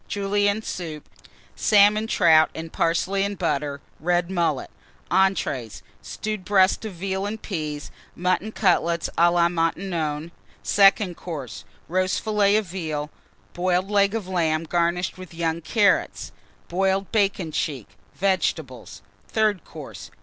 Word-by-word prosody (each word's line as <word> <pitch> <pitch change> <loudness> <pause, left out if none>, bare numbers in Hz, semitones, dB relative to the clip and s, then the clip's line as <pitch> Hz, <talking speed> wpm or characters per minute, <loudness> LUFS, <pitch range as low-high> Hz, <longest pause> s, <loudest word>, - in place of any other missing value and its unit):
Julienne 205 +1 0
Soup. 160 -7 -6 0.5
Salmon 210 +1 +4
Trout 165 -7 +5
and 160 0 -7
Parsley 185 +4 +1
and 200 0 -3
Butter. 145 -4 -2 0.2
Red 175 +2 0
Mullet. 170 -3 -1 0.4
ENTREES. 170 - 0 0.2
Stewed 215 -3 -5
Breast 190 +1 +3
of 215 - -5
Veal 190 +2 -3
and 220 +2 -5
Peas. 155 -7 -5 0.2
Mutton 185 +4 0
Cutlets 170 -5 +1
à 170 +1 +5
la 170 -1 +4
Maintenon. 165 -2 -2 0.3
SECOND 195 -2 +4
COURSE. 140 - -7 0.2
Roast 185 +2 0
Fillet 210 -2 +2
of 215 -1 +2
Veal. 155 -5 -4 0.4
Boiled 185 +2 0
Leg 200 +1 +3
of 215 -5 -3
Lamb, 165 -4 0
garnished 175 +2 -1
with 185 -2 -10
young 165 0 -1
Carrots. 200 +5 +1 0.4
Boiled 190 +2 0
Bacon 195 -6 +1
cheek. 135 -8 -3 0.3
Vegetables. 160 - -2 0.2
THIRD 215 -5 +1
COURSE. - - -10
180 Hz, 125 wpm, -24 LUFS, 165-200 Hz, 0.5 s, Trout